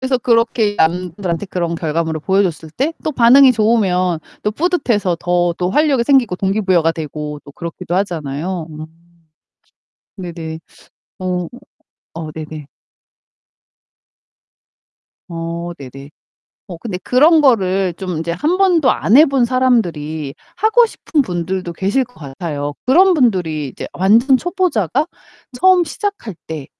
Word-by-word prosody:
그래서 260 -1 0
그렇게 230 -3 +1
남들한테 175 +2 -1
그런 170 -3 -2
결과물을 160 -1 -2
보여 190 +5 +2
줬을 160 -4 -4
때 275 - -1
또 310 - -1
반응이 260 +1 +6
좋으면 195 -6 +1 0.2
또 210 - 0
뿌듯해서 235 - 0
더 175 0 +1
또 180 0 0
활력이 280 0 +2
생기고 250 -8 +3
동기부여가 190 -4 +1
되고 150 -2 -6
또 145 - -13
그렇기도 170 +3 -6
하잖아요 170 -2 -3
음. 155 0 -8 1.3
네네. 165 -4 -6 0.6
어. 180 -2 -2 0.7
어 160 -2 -6
네네. 155 -1 -8 2.6
어 170 +1 -5
네네. 135 +1 -11 0.6
어 180 - -7
근데 195 -2 -5
그런 300 - +4
거를 195 -9 +2
좀 180 -1 -5
인제 165 +1 -3
1 300 - 0
번도 350 -8 +4
안 220 - +2
해 300 - +9
본 270 -3 +2
사람들이 170 - 0 0.2
하고 440 +5 +4
싶은 315 -8 -1
분들도 180 -3 -3
계실 200 +10 0
것 245 0 -24
같아요. 145 0 -5
그런 360 +8 +5
분들이 180 - 0
이제 - - -7
완전 230 +8 +4
초보자가 310 - 0 0.5
처음 370 +3 +5
시작할 390 - -5
때 155 -4 -6
185 Hz, 265 characters per minute, -17 LUFS, 165-255 Hz, 2.6 s, 해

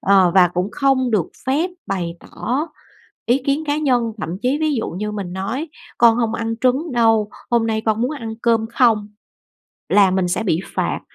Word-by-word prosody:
Ờ, 190 -2 +4
và 180 -2 +6
cũng 180 +3 0
không 265 -3 +1
được 200 -7 +1 0.2
phép 300 +8 +1 0.2
bày 175 -3 -3
tỏ 270 +8 -3 0.6
ý 245 +3 +3
kiến 285 +3 +1
cá 290 0 0
nhân, 245 -6 +1
thậm 160 -3 -4
chí 260 +3 +1
ví 310 -2 +1
dụ 225 - -2
như 210 +4 -4
mình 195 -4 -5
nói: 230 - -3 0.3
"Con 230 0 +5
không 230 -2 0
ăn 225 0 -2
trứng 265 +5 +1
đâu, 225 -3 +3 0.2
hôm 230 -1 +2
nay 220 -1 0
con 220 0 +1
muốn 250 +5 0
ăn 230 -7 -5
cơm 230 -2 +2
không." 225 -5 +3 0.8
Là 200 -2 +5
mình 185 -1 0
sẽ 200 +5 -1
bị 175 -5 0
phạt, - - -1
225 Hz, 195 wpm, -20 LUFS, 200-260 Hz, 0.8 s, và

